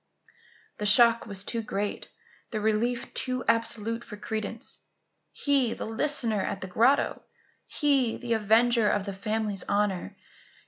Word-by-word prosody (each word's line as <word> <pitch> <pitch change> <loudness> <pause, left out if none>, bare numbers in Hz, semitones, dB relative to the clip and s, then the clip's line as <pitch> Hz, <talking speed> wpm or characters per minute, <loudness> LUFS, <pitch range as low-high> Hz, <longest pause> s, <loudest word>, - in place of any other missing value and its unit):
The 210 - -1
shock 230 +2 +5
was 200 -2 -2
too 230 +2 -3
great, 205 -1 -4 0.4
the 215 - -3
relief 220 +3 -1
too 255 -1 -2
absolute 230 0 0
for 210 -3 -10
credence. 220 +1 -6 0.5
He, 275 -5 +1
the - - -5
listener 225 -2 0
at 190 - -4
the 185 - -5
grotto? 235 +9 +2 0.5
He, 275 -6 +1
the 240 -2 -2
avenger 225 +1 +3
of 200 -1 0
the 200 - -4
family's 210 0 -2
honour? 200 - -1
225 Hz, 135 wpm, -27 LUFS, 210-235 Hz, 0.5 s, shock